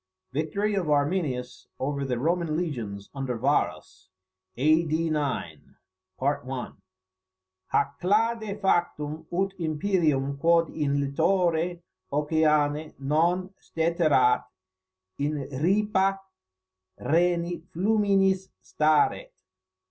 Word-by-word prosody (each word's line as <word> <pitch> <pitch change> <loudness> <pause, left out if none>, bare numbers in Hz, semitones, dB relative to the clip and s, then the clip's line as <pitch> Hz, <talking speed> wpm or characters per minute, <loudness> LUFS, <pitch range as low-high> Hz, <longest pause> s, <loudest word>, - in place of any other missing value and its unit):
VICTORY 200 +9 -1
OF 185 -6 -1
ARMINIUS 145 -4 -1
OVER 140 +1 -2
THE 125 -2 -1
ROMAN 165 +3 0
LEGIONS 115 - -4
UNDER 135 -3 -3
VARUS, 140 +5 -1 0.5
A.D. 155 +3 +2
9. 140 - -3 0.4
"Hac 95 -3 -5
clade 215 +2 0
factum, 160 -5 0
ut 190 +2 0
Imperium 155 -4 0
quod 165 +1 +3
in 145 -2 0
littore 170 +4 +1 0.3
oceani 150 0 +1
non 170 +7 +1
steterat, 160 -6 +2 0.8
in 145 +2 0 0.3
ripa 195 +1 +2 0.8
Rheni 170 +1 +1
fluminis 195 -1 +2
staret." 155 -1 +1
155 Hz, 80 wpm, -26 LUFS, 140-180 Hz, 0.8 s, quod